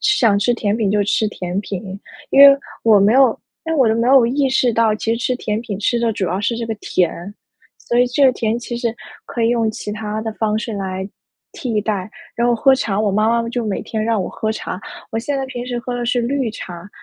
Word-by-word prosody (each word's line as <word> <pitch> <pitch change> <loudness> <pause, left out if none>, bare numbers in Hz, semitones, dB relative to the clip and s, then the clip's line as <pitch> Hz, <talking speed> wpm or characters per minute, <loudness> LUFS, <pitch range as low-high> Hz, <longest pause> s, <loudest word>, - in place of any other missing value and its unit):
想 230 - +3
吃 225 +4 +2
甜 210 -2 -1
品 215 -4 0
就 205 0 +2
吃 210 +2 +1
甜 180 -2 -4
品， 195 -1 -6 0.3
因 275 - +5
为 280 0 +10 0.3
我 220 -2 +6
没 200 +2 +4
有 260 -2 +4 0.3
因 325 - -1
为 320 - 0
我 255 -4 +5
就 220 - +2
没 230 +1 0
有 260 -3 +6
意 270 +3 +1
识 255 -2 +2
到 225 -1 +2
其 225 +1 -1
实 - - -4
吃 250 +1 0
甜 215 -3 -2
品 210 -4 -5
吃 235 +3 +1
的 235 -1 +1
主 200 - -2
要 185 +3 -2
是 230 +3 -1
这 230 - -4
个 225 - -3
甜。 180 0 -2 0.4
所 240 - -1
以 245 - +5
这 275 +3 +2
个 265 - +7
甜 225 -1 -1
其 240 0 -5
实 235 -1 -2 0.3
可 235 - -3
以 225 - +3
用 230 -2 +1
其 215 - -6
它 215 0 -4
的 220 0 -4
方 215 -1 0
式 225 +1 -4
来 190 -1 -4 0.4
替 230 -5 -2
代， 205 -3 -2 0.3
然 235 - +1
后 240 - +3
喝 265 +4 +4
茶 215 -6 0
我 215 -1 +1
妈 215 +3 +2
妈 230 - -4
就 240 -1 -3
每 200 - -2
天 220 -1 -3
让 225 -3 +1
我 - - -4
喝 220 0 -3
茶， 190 -3 -6 0.3
我 225 - -2
现 280 +5 -2
在 270 - -2
平 245 -2 -6
时 245 -1 -3
喝 245 - -5
的 240 -1 -3
是 245 0 +1
绿 260 +1 -1
茶， 175 -3 -9
225 Hz, 270 characters per minute, -19 LUFS, 210-245 Hz, 0.4 s, 为